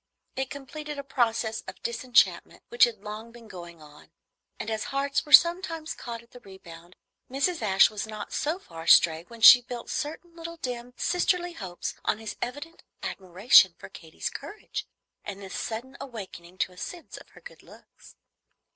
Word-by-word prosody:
It 265 Hz, 0 st, -2 dB
completed 295 Hz, +2 st, -7 dB
a 280 Hz, -, -5 dB
process 230 Hz, -4 st, 0 dB
of -, -, -9 dB
disenchantment 240 Hz, +1 st, +1 dB
which 470 Hz, 0 st, +6 dB
had 480 Hz, -2 st, -7 dB
long 215 Hz, +2 st, -7 dB
been 235 Hz, -1 st, -14 dB
going 170 Hz, -4 st, -11 dB
on; 150 Hz, 0 st, -17 dB, 0.5 s
and 225 Hz, -, -4 dB
as 220 Hz, -1 st, -2 dB
hearts 275 Hz, 0 st, -1 dB
are -, -, -11 dB
sometimes 335 Hz, -2 st, +5 dB
caught 235 Hz, -1 st, -8 dB
at 235 Hz, -, -26 dB
the 245 Hz, -, -13 dB
rebound, 175 Hz, -4 st, -14 dB, 0.3 s
Mrs. 280 Hz, +6 st, 0 dB
Ashe 195 Hz, -2 st, +5 dB
was 215 Hz, 0 st, -4 dB
not 215 Hz, -1 st, -7 dB
so 310 Hz, +4 st, -1 dB
far 165 Hz, -, -11 dB
astray 165 Hz, 0 st, +5 dB
when 230 Hz, -1 st, -13 dB
she 245 Hz, +2 st, +11 dB
built 245 Hz, -1 st, -7 dB
certain 335 Hz, +3 st, -5 dB
little 335 Hz, 0 st, -8 dB
dim 245 Hz, -3 st, -6 dB
sisterly 355 Hz, 0 st, 0 dB
hopes 185 Hz, -, -6 dB
on -, -, +1 dB
his 220 Hz, -1 st, -7 dB
evident 290 Hz, +7 st, -6 dB, 0.2 s
admiration 190 Hz, -1 st, +4 dB
for -, -, -11 dB
Katy's 160 Hz, -1 st, -7 dB
courage 420 Hz, -, -7 dB, 0.4 s
and 200 Hz, -1 st, -7 dB
this 195 Hz, -1 st, -9 dB
sudden 245 Hz, +4 st, -5 dB
awakening 190 Hz, -8 st, -9 dB
to 185 Hz, -, -1 dB
a 180 Hz, -, -18 dB
sense 345 Hz, -, -8 dB
of -, -, -14 dB
her -, -, -14 dB
good -, -, -13 dB
looks. -, -, -18 dB
235 Hz, 175 wpm, -27 LUFS, 195-295 Hz, 0.5 s, she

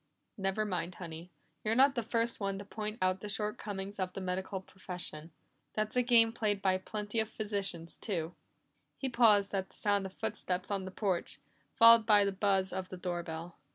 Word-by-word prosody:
"Never 195 Hz, +2 st, -1 dB
mind, 180 Hz, -3 st, -3 dB
Honey. 170 Hz, 0 st, -8 dB, 0.3 s
You're 220 Hz, +1 st, +1 dB
not 270 Hz, +2 st, +6 dB
the 240 Hz, -, -1 dB
first 230 Hz, +1 st, -1 dB
one 195 Hz, -1 st, -2 dB
to 200 Hz, -, -8 dB
point 215 Hz, +1 st, -5 dB
out 185 Hz, 0 st, +2 dB
the 210 Hz, -, -6 dB
shortcomings 205 Hz, -1 st, -4 dB
of 185 Hz, -1 st, -2 dB
the -, -, -5 dB
medical 190 Hz, +1 st, -3 dB
profession. 180 Hz, -4 st, -7 dB, 0.4 s
That's 215 Hz, +1 st, -1 dB
a 250 Hz, -, +4 dB
game 230 Hz, -2 st, +5 dB
played 210 Hz, -3 st, 0 dB
by 190 Hz, -1 st, +2 dB
plenty 210 Hz, +3 st, -3 dB
of 220 Hz, 0 st, 0 dB
physicians 200 Hz, -7 st, -3 dB
too." 175 Hz, -5 st, -3 dB, 0.6 s
He 270 Hz, -, -2 dB
paused 215 Hz, -5 st, +4 dB
at 190 Hz, -1 st, -1 dB
the -, -, -5 dB
sound 200 Hz, -2 st, +1 dB
of 190 Hz, -, -13 dB
footsteps 205 Hz, -4 st, -2 dB
on 195 Hz, -2 st, -1 dB
the -, -, -5 dB
porch, 190 Hz, -2 st, -2 dB, 0.4 s
followed 230 Hz, -1 st, +8 dB
by 205 Hz, -2 st, +7 dB
the 200 Hz, -, +1 dB
buzz 190 Hz, -1 st, +1 dB
of 185 Hz, 0 st, -4 dB
the 185 Hz, -, -7 dB
doorbell. 175 Hz, -2 st, -5 dB
200 Hz, 190 wpm, -32 LUFS, 185-215 Hz, 0.6 s, followed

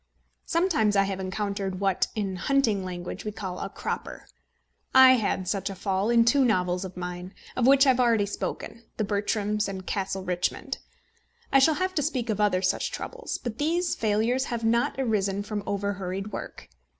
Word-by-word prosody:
Sometimes 325 Hz, -, +2 dB
I 195 Hz, -, +5 dB
have 195 Hz, -1 st, -3 dB
encountered 195 Hz, 0 st, -3 dB
what, 195 Hz, -2 st, +1 dB
in 200 Hz, -3 st, -2 dB
hunting 220 Hz, -2 st, +1 dB
language, 180 Hz, +1 st, -6 dB
we 210 Hz, -, -3 dB
call 190 Hz, -3 st, -6 dB
a -, -, -4 dB
cropper. -, -, -5 dB, 0.7 s
I 260 Hz, 0 st, +10 dB
had 200 Hz, -4 st, -1 dB
such 195 Hz, 0 st, -1 dB
a 195 Hz, -, -6 dB
fall 195 Hz, +2 st, -1 dB
in 235 Hz, -1 st, +5 dB
two 270 Hz, +4 st, +4 dB
novels 180 Hz, -5 st, +1 dB
of 185 Hz, -1 st, -8 dB
mine, 180 Hz, +1 st, -6 dB, 0.2 s
of 250 Hz, -1 st, +2 dB
which 275 Hz, +1 st, +7 dB
I -, -, +5 dB
have 255 Hz, -1 st, +3 dB
already 230 Hz, -4 st, +3 dB
spoken 225 Hz, +3 st, -5 dB
The 215 Hz, -, 0 dB
Bertrams 210 Hz, 0 st, 0 dB
and 190 Hz, -1 st, -6 dB
Castle 195 Hz, -1 st, -2 dB
Richmond. 180 Hz, -1 st, -2 dB, 0.7 s
I 270 Hz, -, +7 dB
shall 305 Hz, +3 st, +4 dB
have 370 Hz, +2 st, -1 dB
to 305 Hz, -, +1 dB
speak 255 Hz, -6 st, -1 dB
of 210 Hz, 0 st, -1 dB
other 190 Hz, -3 st, +2 dB
such -, -, +1 dB
troubles. 485 Hz, -1 st, -5 dB
But 240 Hz, -3 st, -6 dB
these 340 Hz, +4 st, +1 dB
failures 225 Hz, +5 st, +1 dB
have 235 Hz, -3 st, -4 dB
not 235 Hz, +1 st, +2 dB
arisen 205 Hz, -6 st, 0 dB
from 210 Hz, 0 st, -4 dB
over 200 Hz, 0 st, -1 dB
hurried 195 Hz, +1 st, -5 dB
work. -, -, -7 dB
205 Hz, 185 wpm, -26 LUFS, 190-240 Hz, 0.7 s, I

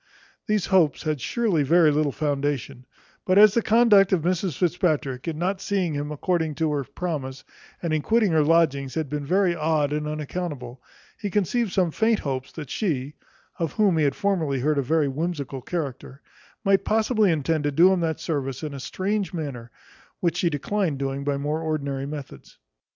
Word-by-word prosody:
These 210 Hz, -3 st, +1 dB
hopes 180 Hz, -7 st, +2 dB
had 155 Hz, -4 st, -2 dB
surely 210 Hz, -, 0 dB
very 160 Hz, +2 st, +4 dB
little 150 Hz, -1 st, +1 dB
foundation; 140 Hz, -4 st, -2 dB, 0.4 s
but 185 Hz, +1 st, +2 dB
as 210 Hz, -1 st, +8 dB
the 235 Hz, -, +2 dB
conduct 215 Hz, -4 st, +5 dB
of 180 Hz, -5 st, +2 dB
Mrs 180 Hz, -3 st, -1 dB
Fitzpatrick, 155 Hz, -7 st, 0 dB
in 160 Hz, -2 st, -3 dB
not 185 Hz, +3 st, -1 dB
seeing 190 Hz, -5 st, -1 dB
him 145 Hz, +1 st, -3 dB
according 160 Hz, 0 st, -1 dB
to 160 Hz, 0 st, 0 dB
her 145 Hz, -2 st, -1 dB
promise, 140 Hz, -2 st, -5 dB, 0.4 s
and 165 Hz, -2 st, -1 dB
in 155 Hz, -, +1 dB
quitting 220 Hz, +1 st, +2 dB
her 160 Hz, -1 st, +4 dB
lodgings, 145 Hz, -4 st, +2 dB
had 160 Hz, -4 st, -2 dB
been 145 Hz, 0 st, -3 dB
very 185 Hz, 0 st, +2 dB
odd 155 Hz, -2 st, 0 dB
and 150 Hz, 0 st, -2 dB
unaccountable, 150 Hz, -5 st, -5 dB, 0.4 s
he 205 Hz, -, -3 dB
conceived 210 Hz, +3 st, 0 dB
some 180 Hz, -4 st, +1 dB
faint 220 Hz, +5 st, +2 dB
hopes, 130 Hz, -2 st, -4 dB
that 150 Hz, -5 st, -8 dB
she 150 Hz, -, -2 dB, 0.5 s
(of 165 Hz, -3 st, -2 dB
whom 205 Hz, -5 st, +3 dB
he -, -, +3 dB
had 140 Hz, -2 st, +1 dB
formerly 175 Hz, -10 st, 0 dB
heard 150 Hz, +1 st, +1 dB
a -, -, +3 dB
very 150 Hz, +3 st, +1 dB
whimsical 145 Hz, -2 st, -3 dB
character) 140 Hz, -2 st, -5 dB, 0.4 s
might 195 Hz, -2 st, +3 dB
possibly 220 Hz, -2 st, +2 dB
intend 155 Hz, 0 st, 0 dB
to 145 Hz, -, +1 dB
do 175 Hz, +6 st, +5 dB
him 185 Hz, -, 0 dB
that 160 Hz, -2 st, -1 dB
service 135 Hz, -4 st, -3 dB
in 150 Hz, -2 st, -4 dB
a 140 Hz, -, -6 dB
strange 190 Hz, +8 st, -2 dB
manner, 135 Hz, -8 st, -5 dB, 0.5 s
which 170 Hz, -2 st, 0 dB
she 170 Hz, -, +2 dB
declined 165 Hz, +1 st, -1 dB
doing 135 Hz, 0 st, -3 dB
by 140 Hz, 0 st, -1 dB
more 150 Hz, +3 st, -2 dB
ordinary 140 Hz, -4 st, -2 dB
methods. 145 Hz, -, -9 dB
155 Hz, 185 wpm, -24 LUFS, 140-185 Hz, 0.5 s, as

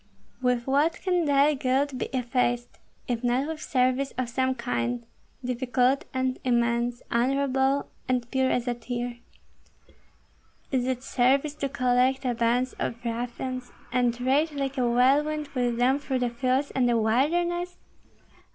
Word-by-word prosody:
"With 250 Hz, -2 st, +1 dB
what 285 Hz, +5 st, +2 dB
can 360 Hz, -3 st, +1 dB
thy 285 Hz, +1 st, +4 dB
guilt 270 Hz, +1 st, 0 dB
be -, -, -1 dB
effaced, 245 Hz, -1 st, -1 dB, 0.3 s
if 240 Hz, -1 st, -2 dB
not 245 Hz, +3 st, +1 dB
with 315 Hz, -1 st, -5 dB
service 255 Hz, 0 st, +1 dB
of 255 Hz, -2 st, -1 dB
some 260 Hz, +2 st, 0 dB
kind, 240 Hz, 0 st, -2 dB, 0.4 s
difficult 255 Hz, +1 st, +1 dB
and 260 Hz, 0 st, -1 dB
immense, 240 Hz, 0 st, +1 dB
honorable 270 Hz, +2 st, +1 dB, 0.2 s
and 250 Hz, -2 st, 0 dB
pure 265 Hz, -1 st, +2 dB
as 250 Hz, -1 st, 0 dB
a 245 Hz, -, +1 dB
tear? 240 Hz, 0 st, -5 dB, 1.5 s
Is 255 Hz, -2 st, +1 dB
it 255 Hz, -1 st, -2 dB
service 270 Hz, +4 st, +2 dB
to 280 Hz, -2 st, -3 dB
collect 255 Hz, +1 st, +2 dB
a 250 Hz, -, +1 dB
band 240 Hz, +2 st, +1 dB
of -, -, -2 dB
ruffians 245 Hz, +2 st, -4 dB, 0.2 s
and 245 Hz, -1 st, +1 dB
rage 280 Hz, +5 st, +2 dB
like 275 Hz, -1 st, -2 dB
a 245 Hz, -1 st, +2 dB
whirlwind 290 Hz, +5 st, +2 dB
with 245 Hz, -3 st, -1 dB
them 255 Hz, +3 st, +3 dB
through 270 Hz, -2 st, -2 dB
the 245 Hz, -1 st, 0 dB
fields 260 Hz, +3 st, 0 dB
and 250 Hz, -2 st, +2 dB
the 235 Hz, -, +3 dB
wilderness? 345 Hz, +11 st, +1 dB
255 Hz, 145 wpm, -26 LUFS, 245-275 Hz, 1.5 s, thy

